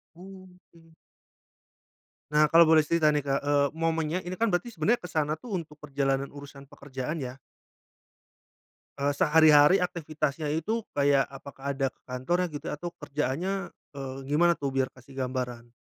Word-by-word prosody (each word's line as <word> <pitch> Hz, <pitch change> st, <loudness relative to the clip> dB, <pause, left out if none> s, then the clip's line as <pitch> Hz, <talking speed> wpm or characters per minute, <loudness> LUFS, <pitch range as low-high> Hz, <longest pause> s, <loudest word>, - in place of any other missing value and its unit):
Oke. 180 Hz, -3 st, -15 dB, 1.4 s
Nah 150 Hz, 0 st, +5 dB
kalo 165 Hz, +2 st, +6 dB
boleh 155 Hz, -2 st, +5 dB
cerita 160 Hz, -2 st, +3 dB
nih 145 Hz, -1 st, -1 dB
Kak, 135 Hz, 0 st, +1 dB
eee, 145 Hz, 0 st, +2 dB
momennya 165 Hz, +1 st, -1 dB
ini 180 Hz, +1 st, -6 dB
kan 230 Hz, -, +2 dB
berarti 235 Hz, +7 st, -1 dB
sebenernya 220 Hz, +5 st, 0 dB
ke 180 Hz, -, -8 dB
sana 155 Hz, -1 st, 0 dB
tuh 240 Hz, +7 st, -11 dB
untuk 155 Hz, -2 st, -9 dB
perjalanan 135 Hz, -1 st, -1 dB
urusan 140 Hz, -1 st, -11 dB
pekerjaan 140 Hz, +2 st, -5 dB
ya? 130 Hz, -3 st, -5 dB, 1.6 s
Eee, 140 Hz, +1 st, +1 dB
sehari-hari 150 Hz, +3 st, +6 dB
aktivitasnya 155 Hz, -4 st, -2 dB
itu 215 Hz, +9 st, -1 dB
kayak 140 Hz, -1 st, +4 dB
apakah 140 Hz, 0 st, -7 dB
ada 135 Hz, 0 st, 0 dB
ke -, -, -40 dB
kantornya 155 Hz, +9 st, -1 dB
gitu? 145 Hz, -, -7 dB
Atau 175 Hz, +4 st, -5 dB
kerjaannya, 175 Hz, +8 st, -2 dB, 0.2 s
eee, 135 Hz, -1 st, -6 dB
gimana 170 Hz, +4 st, +4 dB
tuh, 140 Hz, -1 st, -2 dB
biar 135 Hz, -1 st, +1 dB
kasih 130 Hz, +1 st, -17 dB
gambaran? 125 Hz, -2 st, -4 dB
150 Hz, 150 wpm, -28 LUFS, 140-170 Hz, 1.6 s, kalo